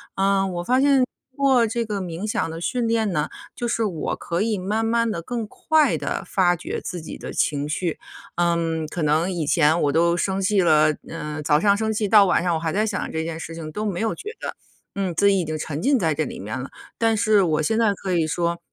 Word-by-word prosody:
嗯， 195 0 +2
我 175 0 -3
发 255 +7 +2
现 275 -2 +4 0.3
做 265 -4 +3
这 230 +1 -2
个 210 -2 -3
冥 175 +2 -5
想 210 -5 -1
的 165 0 -6
训 235 +6 -1
练 225 -3 +1
呢， 150 -4 -1 0.3
就 240 - -3
是 230 -1 0
我 180 -8 -2
可 170 +2 -3
以 215 -1 0
慢 205 +4 -1
慢 230 0 +1
地 170 - -3
更 230 +5 -4
快 315 +6 +2
地 - - -3
发 180 -2 +2
掘 175 - -5
自 180 - -5
己 160 - -8
的 - - -7
情 145 0 0
绪。 165 +2 -2 0.4
嗯， 165 -2 0
可 165 +1 -4
能 155 +5 +2
以 170 -4 -2
前 155 +2 +3
我 145 - +2
都 170 +3 +2
生 190 +2 -1
气 195 +1 +2
了， 155 -3 +4
呃， 150 -2 -5
早 150 0 +3
上 200 +3 +3
生 220 0 -1
气 210 -1 0
到 205 0 +7
晚 180 -2 +2
上 175 -2 +1
我 - - -1
还 160 -1 -2
在 215 +2 +1
想 200 -3 -3
这 160 0 -2
件 160 0 -5
事 165 - -7
情， 160 -2 -7
都 210 +7 -4
没 190 -4 -2
有 225 -1 0
觉 420 - -7
得， - - -5 0.4
嗯， 195 -3 -1
自 200 - +4
己 195 -1 +3
已 - - 0
经 155 0 -3
沉 150 0 -4
浸 275 +2 +3
在 165 -5 +1
这 155 - 0
里 - - -7
面 105 +6 -5
了。 130 - -6 0.3
但 225 -1 +2
是 210 -1 +4
我 160 -3 +1
现 220 +9 0
在 225 -3 +3
可 190 -1 -4
以 165 -2 +2
说， 170 +2 -1
180 Hz, 265 characters per minute, -23 LUFS, 160-215 Hz, 0.4 s, 到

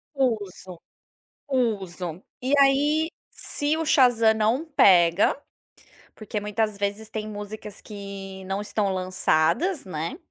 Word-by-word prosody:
Uso, 205 -9 -2 0.7
uso, 190 - -2 0.2
e 260 +3 -1
aí 295 +4 +3 0.2
se 295 +1 -1
o 320 - -2
Shazam 245 -6 +5
não 220 +8 +1
pega, 185 - +5 0.8
porque 215 -1 -4
muitas 210 0 -1
vezes 205 +2 -3
tem 215 -1 -5
músicas 210 0 -8
que 195 -2 -8
não 195 +2 -2
estão 205 -1 -1
lançadas, 185 - +1
né, 170 - -4
210 Hz, 110 wpm, -25 LUFS, 190-255 Hz, 0.8 s, Shazam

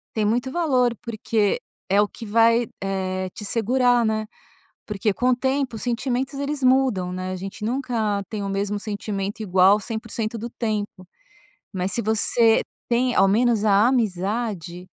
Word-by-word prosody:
Tem 215 -1 +1
muito 240 +5 0
valor, 260 -8 +1
porque 220 -2 0 0.3
é 200 +2 +3
o 205 - +4
que 230 - -11
vai, 230 +2 +3 0.2
eh, 185 -1 -2
te - - -8
segurar, 240 +3 +2
né? 220 0 -1 0.6
Porque 210 0 -1
com 250 +5 +1
o 255 - +4
tempo 265 -1 -1
os 220 - -6
sentimentos, 255 +3 -2
eles 285 0 -3
mudam, 255 -9 +2
né? 185 0 -4
A - - -3
gente 195 +3 -6
nunca 230 -5 -1
tem 215 -2 -4
o 200 - -3
mesmo 200 +1 -2
sentimento 205 0 -4
igual 190 +1 +5
100% 225 0 -4
do 235 +2 -5
tempo, 210 -5 -4 0.7
mas 185 0 -2
se 235 - 0
você 220 +1 +3 0.3
tem 245 +1 +2
ao 195 - +5
menos 220 +2 +2
a 210 +2 +5
amizade, 195 -5 -2
220 Hz, 160 wpm, -23 LUFS, 200-245 Hz, 0.7 s, igual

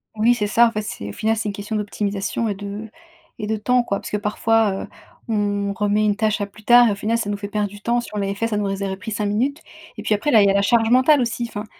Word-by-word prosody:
Oui, 225 +3 +4
c'est 210 -4 -1
ça. 235 +3 +5
En - - -2
fait, 215 - -2
c'est 100 - -6
au - - -5
final, 220 - 0
c'est 215 -1 -2
une - - -4
question 205 +2 -5
d'optimisation 205 +1 -2
et 205 - -2
de 205 +2 -7 0.5
et 210 - -5
de 220 0 -1
temps, 245 +3 +2
quoi. 200 -4 -2
Puisque 210 - -4
parfois, 210 -1 +1
heu, - - -9 0.4
on 205 -2 -1
remet 210 +1 +1
une 205 -1 +2
tâche 215 0 0
à 205 - -1
plus 205 +2 -17
tard 240 +2 +7
et, - - +2
au - - -5
final, 220 +3 -1
ça 225 -3 -3
nous 205 - -1
fait 200 0 -6
perdre 210 0 -1
du 205 +1 -13
temps. 235 +3 +1
Si 240 - -7
on - - -4
l'avait 200 -1 -1
fait, 230 +3 -1
ça 225 - -2
nous 200 -1 -1
aurait 195 -1 -3
pris 220 +3 -8
5 210 0 -2
minutes, 250 +9 -1 0.4
et 215 - -7
puis 215 -1 +2
après, 290 +9 -1
là, 220 - +7
il 200 - +5
y - - +4
a - - +3
la 200 - +3
charge 225 +2 +3
mentale 260 +5 +5
aussi. 240 -1 -1
Enfin, 210 -1 -6
210 Hz, 300 wpm, -21 LUFS, 205-225 Hz, 0.5 s, tard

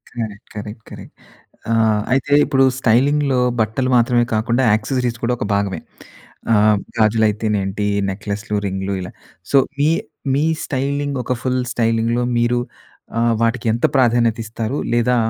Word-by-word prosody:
Correct. 110 -4 -6
Correct. 105 +1 -7
Correct. - - -11 0.6
ఆహ్, 110 -2 +2
అయితే 135 +2 0
ఇప్పుడు 135 -1 +2
స్టైలింగ్‌లో 135 +3 +2 0.2
బట్టలు 120 +4 0
మాత్రమే 120 0 +3
కాకుండా, 115 +4 +1
యాక్సెసరీస్ 120 +2 -1
కూడా 125 +1 +1
ఒక - - -2
భాగమే. 100 -4 -1 0.7
ఆహ్, 105 -1 +4 0.2
గాజులైతే‌నేంటి, 105 -2 +1 0.2
నెక్లెస్‌లు, 105 +2 -4
రింగ్లు 95 0 -3
ఇలా. 90 - -8 0.4
సో, 140 - +7 0.2
మీ 150 +2 +4 0.4
మీ 145 - +1 0.2
స్టైలింగ్. 140 +1 -2
ఒక 125 - -1
ఫుల్ 130 0 0
స్టైలింగ్‌లో 115 +1 +1 0.2
మీరు 120 +1 +2 0.6
ఆహ్, 115 0 +2
వాటికి 115 +1 0
ఎంత 120 - -3
ప్రాధాన్యత 120 -2 +3
ఇస్తారు. 115 +4 -3 0.2
లేదా 120 +1 +2
115 Hz, 130 wpm, -19 LUFS, 105-125 Hz, 0.7 s, సో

